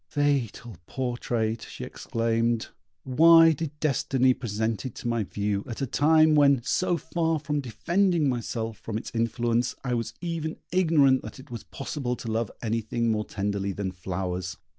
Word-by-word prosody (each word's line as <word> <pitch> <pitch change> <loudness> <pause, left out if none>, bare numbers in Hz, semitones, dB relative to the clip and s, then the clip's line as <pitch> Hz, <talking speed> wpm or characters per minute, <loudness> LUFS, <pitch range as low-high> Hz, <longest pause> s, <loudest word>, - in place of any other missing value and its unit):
Fatal 130 - -1
portrait!" 120 -3 -2
she - - -8
exclaimed; 115 0 -1 0.3
"why 165 +5 +7
did 150 -1 -4
destiny 130 -3 +2
present 110 -4 -2
it 130 - -6
to - - -6
my 115 -2 0
view 100 +1 -2
at 115 - -6
a 135 - 0
time 155 +4 +4
when, 140 -3 +5
so 175 +6 +1
far 165 0 -1
from 150 0 -2
defending 170 - +1
myself 115 -3 -3
from 110 -1 -4
its - - -6
influence, 115 +1 0
I 125 -2 -1
was 115 -1 -2
even 165 -2 -3
ignorant 155 -7 +4
that - - -9
it 130 - -14
was 115 - -6
possible 135 -2 -4
to 115 -2 -6
love 110 -1 -1
anything 115 +1 0
more 105 -1 -1
tenderly 100 -1 -2
than 95 -1 -3
flowers." 90 0 -4
120 Hz, 160 wpm, -26 LUFS, 110-145 Hz, 0.3 s, why